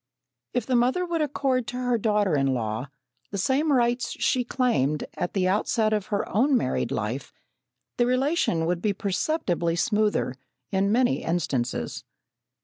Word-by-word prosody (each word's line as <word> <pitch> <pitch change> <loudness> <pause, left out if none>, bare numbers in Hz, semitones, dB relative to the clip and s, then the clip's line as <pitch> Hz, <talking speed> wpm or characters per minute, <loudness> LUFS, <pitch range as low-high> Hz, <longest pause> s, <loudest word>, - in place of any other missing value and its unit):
If 245 - 0
the 255 - +1
mother 255 +10 +2
would 340 -2 -1
accord 270 -4 0
to 245 - -4
her 245 -2 0
daughter 210 -5 +2
in 135 -2 +2
law 110 +2 -3 0.4
the 200 - -4
same 270 - +1
rights 245 -1 +1
she 255 - +1
claimed 235 - +1
at 180 - -3
the 185 -2 +1
outset 215 +3 +1
of 210 -1 -1
her 200 -1 -1
own 265 +5 +4
married - - -1
life, - - -3 0.7
the 240 - +3
relation 255 - +1
would 175 +1 -1
be 210 -2 +1
perceptibly 185 - -1
smoother 210 - +1 0.4
in 195 +1 +1
many 250 +3 +2
instances. 135 -8 -2
215 Hz, 150 wpm, -26 LUFS, 180-255 Hz, 0.7 s, own